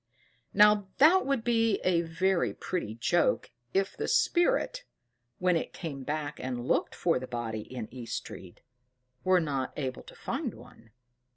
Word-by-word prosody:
Now 210 -1 +5
that 325 +4 +6
would 275 -5 +1
be 230 -3 +2
a 175 -2 +3
very 175 +2 0
pretty 165 - -3
joke, 175 - +1 0.2
if 195 0 0
the - - -3
spirit - - +2 0.5
when 180 -1 +2
it 165 - -2
came 145 -6 -6
back 150 +1 -3
and 125 -1 -4
looked - - +1
for 170 -6 +1
the 130 - -7
body 115 -3 -3
in 120 -4 -5
East 120 -3 -4
Street, 90 -2 -10 0.6
were 185 -1 +4
not 140 -5 -2
to 130 -4 -5
find - - -3
one. 115 0 -16
170 Hz, 150 wpm, -29 LUFS, 130-205 Hz, 0.6 s, that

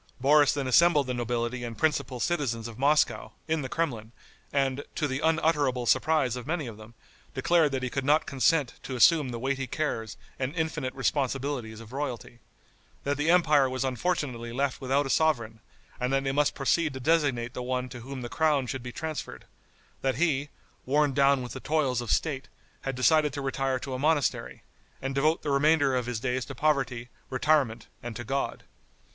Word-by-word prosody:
Boris 145 +2 +5
then 145 -2 -2
assembled 150 +2 +5
the 125 - -2
nobility 120 0 -2
and 115 -1 -6
principal 140 -5 0
citizens 120 -7 -1
of 115 0 -10
Moscow, 145 +2 +2
in 160 -1 0
the 130 - -5
Kremlin, 120 -9 -3 0.4
and, 135 0 0
to 150 - 0
the 130 0 -2
unutterable 150 -5 +1
surprise 145 -2 +2
of 125 +1 -7
many 160 -2 -1
of 115 -3 -7
them, 110 +2 -13 0.4
declared 155 +3 +3
that 130 -1 -2
he 130 - -1
could 135 - -2
not 150 +3 +3
consent 140 0 +2
to 130 - -6
assume 150 +2 +5
the 120 - -4
weighty 135 +2 -2
cares 115 -6 -3 0.2
and 135 +4 -2
infinite 160 -6 -2
responsibilities 135 -4 -1
of 115 +1 -12
royalty; 130 -4 -5 0.6
that 140 0 0
the 145 +3 0
empire 150 -6 +4
was 130 +1 -2
unfortunately 130 -4 -2
left 135 +2 -1
without 135 +2 +1
a - - -4
sovereign, 115 -9 +1 0.4
and 125 +1 -1
that 135 0 +1
they 135 - 0
must 145 +1 +1
proceed 150 +1 +1
to - - -5
designate 135 -5 +1
the - - -5
one 125 0 -2
to 125 -1 -9
whom 130 +1 -7
the - - -4
crown 150 0 +1
should 130 +1 -4
be 125 0 -7
transferred; 155 +3 -6 0.6
that 135 -1 0
he, 145 -3 +1 0.3
worn 145 +1 +2
down 140 -1 +3
with 125 - -7
the 130 - -6
toils 135 -5 0
of 120 - -7
State, 135 -4 -1 0.3
had 135 -1 -3
decided 150 +3 +3
to 145 - -5
retire 135 -1 -1
to 130 +1 -6
a 130 - -3
monastery, 150 0 0 0.4
and 135 +1 -3
devote 155 +4 +1
the 145 - -1
remainder 140 -1 +3
of 125 -1 -1
his 120 -3 -2
days 125 +1 -1
to - - -8
poverty, 130 -5 0 0.2
retirement 130 -4 +1 0.2
and 120 -2 -6
to 120 - -5
God. 135 +4 -2
135 Hz, 190 wpm, -28 LUFS, 125-150 Hz, 0.6 s, Boris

